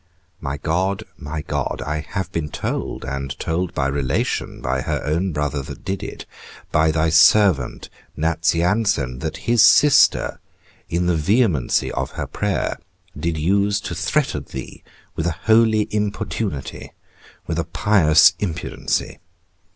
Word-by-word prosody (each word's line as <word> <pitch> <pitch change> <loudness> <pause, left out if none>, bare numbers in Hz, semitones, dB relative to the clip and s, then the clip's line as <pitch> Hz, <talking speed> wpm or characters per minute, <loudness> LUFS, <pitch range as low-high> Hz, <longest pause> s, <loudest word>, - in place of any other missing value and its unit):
My 70 -1 -4
God, 90 +6 -1
my 75 +1 -6
God, - - -3
I 75 +1 -2
have 95 +3 -5
been 80 -2 -3
told, - - -4
and 70 +1 -4
told 85 +2 -2
by 70 - 0
relation, 70 -1 -1
by 65 +1 -1
her - - -2
own 85 +5 0
brother 75 -2 -2
that 65 - -10
did 95 +1 -3
it, - - -7 0.5
by 80 +1 +3
thy 80 +1 +1
servant 85 - +4 0.3
Nazianzen, 85 - +1
that 80 +1 -4
his 120 -1 +4
sister 150 -2 +5 0.5
in 85 +1 0
the 90 -1 +2
vehemency 90 - +1
of - - -3
her - - -4
prayer, 105 -3 -2 0.4
did 85 -1 -2
use 100 +5 +1
to - - -5
threaten - - -1
thee - - -8 0.3
with 80 - -1
a 85 - -2
holy 110 -1 +4
importunity, 105 -6 -3 0.5
with - - -2
a - - +1
pious 85 -5 +4
impudency. 85 -5 -3
80 Hz, 135 wpm, -21 LUFS, 75-100 Hz, 0.5 s, sister